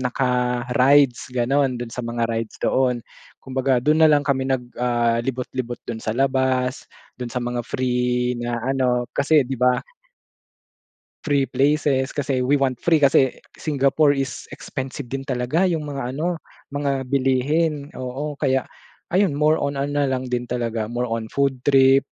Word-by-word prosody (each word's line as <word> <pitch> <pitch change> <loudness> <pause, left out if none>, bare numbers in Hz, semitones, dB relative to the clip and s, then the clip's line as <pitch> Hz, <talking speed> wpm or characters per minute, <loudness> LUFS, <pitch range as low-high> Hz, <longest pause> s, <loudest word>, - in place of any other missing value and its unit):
naka 125 -1 0 0.2
rides, 135 -1 +4
ganun. 130 +2 +1
Dun 120 -1 -6
sa 125 - -4
mga 115 0 -1
rides 115 -1 -3
doon. 125 -2 +2 0.4
Kumbaga 130 0 +1
dun 155 +3 +3
na 160 - +8
lang 145 -1 +4
kami 135 -2 0
nag, 125 -2 -2
ah, 120 -1 +2
libot-libot 125 -1 -4
dun 115 -1 -5
sa 110 - -3
labas 130 0 0 0.3
dun 125 -1 -4
sa 125 - -2
mga 120 0 -2
free 125 -1 0
na 120 0 -2
ano, 130 -2 +1
kasi, 145 +1 +3
'di 130 -1 -5
ba 125 0 +3 1.4
free 140 -3 +1
places 140 0 +1
kasi 135 -3 -1
we 140 +3 +2
want 135 -2 +1
free 165 -2 +4
kasi 135 -2 +3 0.2
Singapore 145 0 +2
is 135 -3 -4
expensive 135 0 -6
din 135 +2 -4
talaga 130 +6 -1
yung 155 -3 -2
mga 135 -3 -4
ano, 170 +4 -1 0.4
mga 140 -2 -1
bilihin, 140 +3 +1
oo. 130 +4 -4
Kaya 135 -3 +1 0.5
ayun 195 0 +4
more 150 +1 +3
on 140 0 -2
ano 145 +1 0
lang 130 -1 -2
din 125 -1 -2
talaga 115 -3 -2
more 120 +1 -1
on 115 -1 -4
food 135 -2 0
trip 135 -1 +5
130 Hz, 155 wpm, -22 LUFS, 125-140 Hz, 1.4 s, na